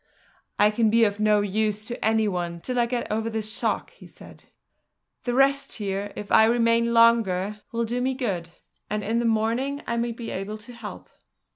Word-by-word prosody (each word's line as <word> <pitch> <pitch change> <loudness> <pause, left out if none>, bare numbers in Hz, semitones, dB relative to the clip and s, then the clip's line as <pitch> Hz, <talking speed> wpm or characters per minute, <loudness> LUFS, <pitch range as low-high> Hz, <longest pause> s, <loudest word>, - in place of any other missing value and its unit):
"I 210 0 +5
can 220 0 +2
be 230 +1 +4
of 205 -1 +1
no 210 -1 +3
use 210 +1 -1
to 240 +2 -6
any 220 0 +2
one 175 -3 -3
till 250 +7 -2
I 235 - +2
get 240 -2 -3
over 220 +1 -1
this 220 -1 -3
shock," - - -1
he - - -15
said. - - -15 0.8
"The 245 -1 -1
rest 275 +1 +2
here, 200 -1 -3
if 205 -1 -7
I 220 - +7
remain 230 0 +2
longer, 210 -4 +3
will 235 0 -1
do 240 +2 -2
me 260 +1 0
good; 195 -10 -3 0.4
and 210 0 -2
in 225 +4 0
the 240 - -1
morning 230 +6 0
I 235 - -2
may 235 0 -1
be 230 0 -7
able 195 +3 -4
to 225 +3 -12
help." 235 -3 -9
225 Hz, 195 wpm, -25 LUFS, 210-235 Hz, 0.8 s, I